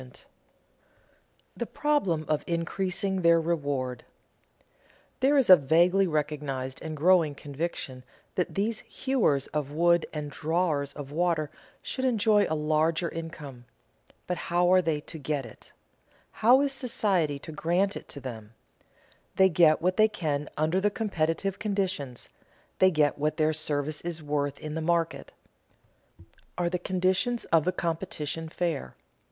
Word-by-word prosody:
[Sidenote: 125 0 -15 1.3
The - - -3
problem 195 - 0
of 155 -1 0
increasing 185 +3 -1
their 170 -1 +5
reward] 140 -7 -2 1.2
There 275 +2 +3
is 270 - +3
a 185 - +11
vaguely 175 +6 +3
recognized 145 -4 -3
and 155 -1 -5
growing 165 -2 +4
conviction 140 -3 -5 0.3
that 180 - -2
these 215 +3 0
hewers 225 - 0
of 150 -2 -1
wood 170 +3 +2
and 150 -2 -5
drawers 155 -2 -1
of 140 -1 -8
water 160 -2 0 0.3
should 260 - -4
enjoy 220 -4 +3
a 160 - 0
larger 155 +2 +1
income. 150 -6 -8 0.6
But 180 - -2
how 175 +1 +3
are 185 - +6
they 160 -3 -1
to 160 - -9
get 145 -1 -2
it? 115 - -14 0.6
How 250 +5 +5
is 280 -1 +1
society 200 - 0
to 145 - -10
grant 175 +6 0
it - - -8
to 140 - -8
them? 115 -4 -8 0.8
They 190 0 +5
get 160 -2 +4
what 185 +1 +1
they 215 - +6
can 150 -9 -3
under 160 +5 +1
the 205 - +3
competitive 195 -3 -1
conditions, 190 - -2 0.5
they 190 - +6
get 150 -4 +1
what 150 +1 0
their 155 0 +2
service 150 -1 -1
is 170 -2 -4
worth 145 -1 -1
in 155 -1 -6
the 160 - -3
market. 165 -3 -1 1.3
Are 175 -1 0
the 180 - -1
conditions 190 +7 0
of 160 -2 +5
the 185 - +2
competition 165 -2 -3
fair? 170 -4 -3
165 Hz, 145 wpm, -28 LUFS, 150-185 Hz, 1.3 s, a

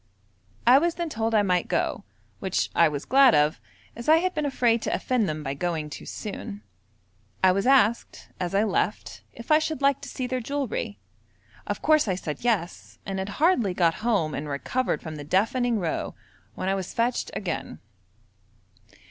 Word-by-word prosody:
I 250 +3 +7
was 340 +2 0
then 340 -1 -3
told 225 -4 -1
I 210 - +4
might 180 -3 +1
go, - - -1 0.4
which - - -1
I - - +5
was 145 -1 -5
glad 265 -2 +6
of, 150 +1 +2 0.3
as 235 +5 -5
I 315 - +8
had 365 +2 0
been 300 -1 -1
afraid 235 -4 +2
to - - -2
offend 240 -7 0
them 155 0 -4
by 135 -1 -3
going 155 0 -3
too - - -8
soon. 105 - -7 0.8
I 185 - +7
was 195 +5 0
asked, 240 -4 +2
as 180 +1 -2
I 200 - +4
left, 210 0 -2
if 235 +5 -8
I 305 - +7
should 315 -2 -3
like 275 -1 +2
to - - -8
see 255 - -4
their 255 +1 -2
jewellery; 250 - -3 0.7
of 205 - -4
course 310 -4 +4
I 190 - +1
said 160 -2 -6
'Yes,' 210 -8 -2
and 195 -1 -3
had 190 +1 -3
hardly 250 - +2
got 170 -3 +3
home 205 -10 +1
and 150 +1 -4
recovered 240 - -2
from 155 -2 -6
the 145 - -7
deafening 225 - +1
row, 170 -5 -3 0.4
when - - -4
I 195 - +2
was 190 -2 -4
fetched 235 +1 0
again. 180 - -4
215 Hz, 185 wpm, -26 LUFS, 175-255 Hz, 0.8 s, I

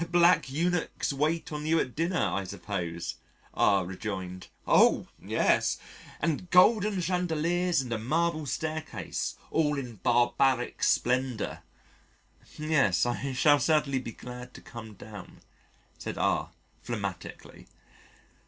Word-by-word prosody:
'" 170 - -3
"Black 175 -3 +4
eunuchs 170 +1 -1
wait 160 +4 0
on 150 0 -4
you 165 +1 +3
at 125 - -2
dinner, 170 +3 0
I 100 - 0
suppose," 85 -2 -4 0.4
R 100 -3 +3
rejoined. 95 -1 -5 0.2
"Oh! - - +4
yes - - +2 0.4
and 165 +3 -1
golden 200 +1 +5
chandeliers 175 -1 +1
and 125 -3 -4
a 110 - -1
marble 155 +5 0
stair 155 +4 -2
case 110 - -4 0.2
all 150 -2 +2
in 125 -5 -6
barbaric 120 +3 +2
splendour." 125 -3 +1 1.0
"Yes, 150 - +2
I 130 +3 -2
shall 145 +3 +5
certainly 150 -2 +2
be 120 -3 -7
glad 125 0 -9
to - - -10
come 110 -3 -10
down," 105 -1 -11 0.6
said - - -5
R, - - +1 0.3
phlegmatically. - - -6
140 Hz, 125 wpm, -29 LUFS, 115-165 Hz, 1.0 s, golden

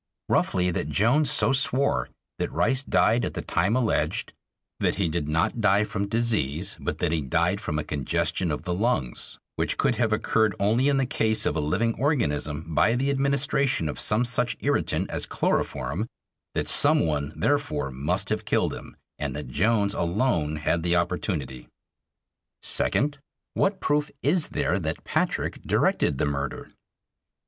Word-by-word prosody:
Roughly, 90 0 +2
that 75 - -2
Jones 125 - +3
so 135 - +4
swore; 135 +1 +2 0.3
that - - -2
Rice 135 0 +2
died 120 -3 +2
at - - -3
the - - -4
time 95 +7 +1
alleged; 125 -3 0 0.5
that - - +1
he 100 -4 0
did 80 -2 -2
not 80 +9 0
die 105 0 +4
from 100 -1 -3
disease, 100 - -1
but - - -3
that 85 - 0
he 80 -2 0
died 85 +8 0
from 75 -8 -2
a 75 - -1
congestion 85 +5 -1
of 75 +1 -3
the 90 0 -2
lungs 95 - -1 0.2
which - - -1
could - - +1
have 110 -3 +1
occurred 110 0 +1
only 110 +7 +2
in 140 -1 +3
the 135 - +2
case 110 -4 +1
of - - 0
a - - 0
living 95 +10 0
organism 80 - -1
by 85 +9 +3
the 135 +3 +1
administration 140 - +1
of 75 - -3
some 115 +4 +2
such 120 0 0
irritant - - 0
as - - -3
chloroform; 70 - -1 0.5
that - - -1
some - - +3
one, 75 -3 -1
therefore, 110 - 0
must 65 +3 0
have - - -1
killed - - +1
him, - - -10 0.2
and 70 -3 -3
that 75 -3 -6
Jones 100 - +2
alone 85 - 0
had 80 +2 0
the 85 +1 +1
opportunity. 85 - -2 1.0
Second: 145 +2 +1 0.3
What 195 0 +1
proof 145 +1 0
is 155 +3 +2
there 140 -10 0
that 80 -3 -4
Patrick - - -1
directed 70 - +1
the - - +1
murder? 70 0 -4
95 Hz, 165 wpm, -26 LUFS, 75-125 Hz, 1.0 s, so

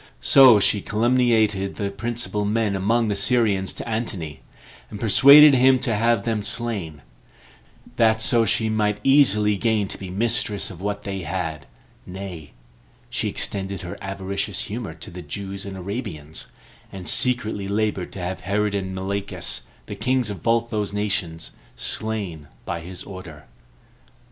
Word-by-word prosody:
So 130 -6 +8
she 100 +1 +2
calumniated 110 -4 +1
the 100 -1 -3
principal 115 0 -2
men 105 -1 0
among 110 +4 +1
the 105 - 0
Syrians 100 -2 +2
to - - -7
Antony, 100 - -4 0.5
and 105 - -8
persuaded 140 +8 +8
him 130 0 +5
to 125 -2 -1
have 115 -1 +2
them 110 -2 0
slain, 100 - -3 0.9
that 110 -1 +4
so 115 +1 +3
she 110 +1 +1
might 105 -1 0
easily 105 -7 +4
gain 110 -2 +1
to - - -6
be 95 - -7
mistress 105 0 0
of 90 -1 -11
what 105 +1 -3
they 95 -1 -4
had; 85 -2 -4 0.4
nay, 90 -5 -8 0.6
she - - -2
extended 95 -1 -4
her 90 - -6
avaricious 100 0 -3
humor 110 0 -5
to - - -10
the 90 +1 -8
Jews 95 +5 -6
and 95 -1 -7
Arabians, 90 - -6 0.4
and 95 -2 -8
secretly 110 -6 +2
labored 105 -2 -1
to - - -6
have 90 +1 -4
Herod 105 +2 0
and 95 -2 -3
Malichus, 100 +1 -3 0.2
the - - -7
kings 125 -4 0
of 95 -5 -7
both 115 0 +1
those 105 -2 -2
nations, 95 -6 -2 0.2
slain 90 - -4 0.2
by 85 - -3
his 90 +2 -8
order. 90 -6 -10
100 Hz, 150 wpm, -23 LUFS, 95-115 Hz, 0.9 s, So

